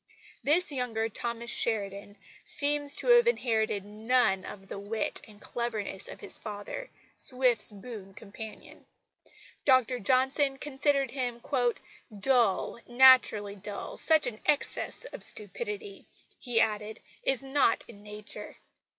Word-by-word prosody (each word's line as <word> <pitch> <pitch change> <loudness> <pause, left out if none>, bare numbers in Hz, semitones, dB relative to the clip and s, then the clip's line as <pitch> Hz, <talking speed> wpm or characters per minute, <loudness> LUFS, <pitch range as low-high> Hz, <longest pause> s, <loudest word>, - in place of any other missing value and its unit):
This 320 +4 +4
younger 230 -4 -2
Thomas 235 +2 -4
Sheridan 205 -2 -1 0.3
seems 290 0 +1
to - - +5
have 480 0 +7
inherited 220 - 0
none 215 -2 +1
of 195 -1 -9
the 195 - -6
wit 215 +2 -3
and 210 -2 -16
cleverness 220 -6 -4
of - - -10
his - - -4
father, 215 - -7 0.3
Swift's 250 -4 +2
boon 200 -2 -10
companion. 215 +2 -11 0.8
Dr 255 -2 +3
Johnson 265 +4 +2
considered 275 -2 0
him 245 -3 -3 0.8
"dull, 235 -2 +2
naturally 240 -5 +5
dull. 205 0 -7
Such 315 -2 +3
an 240 -3 -4
excess 295 - 0
of - - -9
stupidity," 410 - -4 0.3
he 245 -3 0
added, 215 0 0 0.2
"is 270 0 +1
not 270 -3 +2
in 205 -3 -14
nature." 210 0 -4
235 Hz, 120 wpm, -29 LUFS, 210-270 Hz, 0.8 s, have